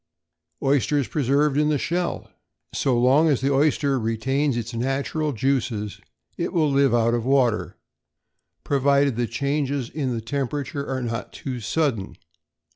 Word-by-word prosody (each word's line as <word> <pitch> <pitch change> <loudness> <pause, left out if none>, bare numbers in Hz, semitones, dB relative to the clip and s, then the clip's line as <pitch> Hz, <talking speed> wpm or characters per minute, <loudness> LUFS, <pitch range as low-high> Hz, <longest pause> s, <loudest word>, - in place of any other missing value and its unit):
=Oysters 140 0 +2
Preserved 140 +1 +1
in 150 0 +2
Shell.= 175 +5 -2 0.5
So 125 -3 +1
long 135 +6 +4
as 140 - +2
the 140 +1 +1
oyster 140 -1 +2
retains 120 +5 0
its 120 +1 -4
natural 135 +5 -1
juices, 115 -4 -1 0.4
it - - -2
will 155 -4 +2
live 140 0 +3
out 115 0 +2
of 120 -1 0
water, 125 -4 +1 0.9
provided 140 -1 +2
the 120 0 -1
changes 140 +1 -2
in 140 -5 -2
the 115 - -2
temperature 140 +4 -3
are 130 -1 -2
not 115 0 -4
too 130 -3 -5
sudden. 115 -3 -1
135 Hz, 135 wpm, -24 LUFS, 120-145 Hz, 0.9 s, long